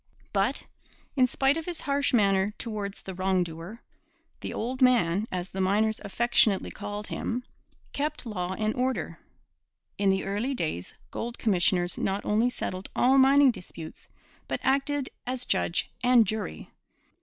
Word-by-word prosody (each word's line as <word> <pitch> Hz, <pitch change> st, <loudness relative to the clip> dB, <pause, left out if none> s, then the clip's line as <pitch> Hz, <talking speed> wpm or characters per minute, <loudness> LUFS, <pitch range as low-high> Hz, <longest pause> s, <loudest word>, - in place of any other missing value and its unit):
But, -, -, 0 dB, 0.5 s
in 255 Hz, -2 st, +5 dB
spite 270 Hz, +4 st, +2 dB
of 325 Hz, -, -5 dB
his 345 Hz, -2 st, -4 dB
harsh 280 Hz, 0 st, +1 dB
manner 200 Hz, -3 st, +3 dB
towards 210 Hz, -3 st, -5 dB
the 190 Hz, -, -6 dB
wrong 185 Hz, 0 st, +1 dB
doer, 170 Hz, +7 st, -9 dB, 0.6 s
'the -, -, -5 dB
old 255 Hz, +4 st, -3 dB
man,' 220 Hz, -6 st, +4 dB
as 180 Hz, 0 st, -3 dB
the 190 Hz, -, -3 dB
miners 215 Hz, +3 st, +2 dB
affectionately 210 Hz, -1 st, +2 dB
called 205 Hz, +1 st, -5 dB
him, 245 Hz, +3 st, -3 dB, 0.5 s
kept 295 Hz, -1 st, -2 dB
law 190 Hz, -4 st, -3 dB
and 215 Hz, 0 st, 0 dB
order. 255 Hz, +1 st, -2 dB, 0.8 s
In 200 Hz, -1 st, +3 dB
the 190 Hz, 0 st, +2 dB
early 210 Hz, +8 st, -1 dB
days 155 Hz, -, -3 dB, 0.2 s
gold 235 Hz, +1 st, -4 dB
commissioners 180 Hz, -3 st, +2 dB
not 195 Hz, +1 st, -1 dB
only 220 Hz, +4 st, +3 dB
settled 185 Hz, -5 st, -5 dB
all 265 Hz, +2 st, +5 dB
mining 275 Hz, 0 st, +6 dB
disputes, 170 Hz, -6 st, -10 dB, 0.4 s
but -, -, -2 dB
acted 275 Hz, 0 st, +1 dB, 0.2 s
as 255 Hz, 0 st, -2 dB
judge 185 Hz, -3 st, 0 dB
and 245 Hz, -2 st, +6 dB
jury. 210 Hz, -, -4 dB
215 Hz, 145 wpm, -27 LUFS, 190-255 Hz, 0.8 s, mining